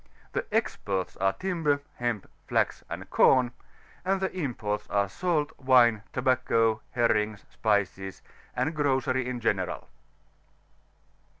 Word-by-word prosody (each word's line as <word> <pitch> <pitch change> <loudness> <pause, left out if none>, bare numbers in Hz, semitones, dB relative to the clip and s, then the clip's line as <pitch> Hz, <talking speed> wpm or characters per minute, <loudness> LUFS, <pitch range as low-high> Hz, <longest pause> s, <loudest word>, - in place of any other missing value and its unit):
The - - 0
exports 95 -2 -1
are 95 0 +2
timber, 165 -7 0 0.2
nemp, 120 -4 -1 0.2
flax, - - +1
and - - -6
com; 125 -2 +5 0.5
and 190 +1 +1
the 190 0 -2
imports 105 - -3
are 100 -1 +2
salt, 155 - 0
wine> 125 -5 +5
tobacco, 125 -4 +2
herrings, 110 -3 +1
spices, 95 -3 -1 0.3
and 160 - 0
grocery 130 -3 +1
m 125 -1 -3
general. 100 -5 -1
120 Hz, 110 wpm, -28 LUFS, 105-140 Hz, 0.5 s, com